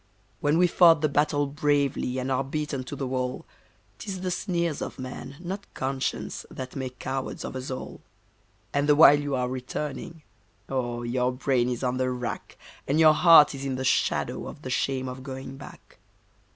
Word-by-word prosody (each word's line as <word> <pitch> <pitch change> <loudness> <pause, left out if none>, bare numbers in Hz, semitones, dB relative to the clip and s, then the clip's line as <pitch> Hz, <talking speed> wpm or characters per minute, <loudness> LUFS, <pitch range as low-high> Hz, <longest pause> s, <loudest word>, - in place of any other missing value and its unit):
When 145 +2 +2
we've 175 -1 +3
fought 165 -4 +6
the 155 - +3
battle 145 0 +2
bravely 140 -3 0
and 130 +1 -2
are 130 +1 +1
beaten 145 -1 -3
to 145 - -6
the 135 - -3
wall, 125 0 -3 0.5
'Tis 190 -4 -5
the 185 -1 -2
sneers 170 -4 -1
of - - -5
men, 130 +1 -7
not 190 +3 -6
conscience, 130 0 -3
that 130 -1 -7
make 130 -2 -5
cowards 130 0 -4
of - - -6
us 130 +1 -5
all; 130 - -6 0.7
And 145 +1 +1
the 150 - +7
while 145 -1 +8
you 145 -1 -2
are 125 -1 0
returning, 135 +4 -5 0.4
oh! 120 -3 -2
your 125 +1 0
brain 125 -1 +1
is 125 +1 -3
on 125 0 0
the 130 0 0
rack, 125 -3 -5 0.3
And 145 +3 +2
your 155 -1 +7
heart 165 -2 +7
is 135 0 -6
in 135 -1 -2
the 130 +1 -3
shadow - - 0
of 145 - -10
the 130 - -5
shame 130 0 -1
of 130 +1 -6
going 130 0 -7
back. 140 - -13
135 Hz, 185 wpm, -26 LUFS, 130-150 Hz, 0.7 s, while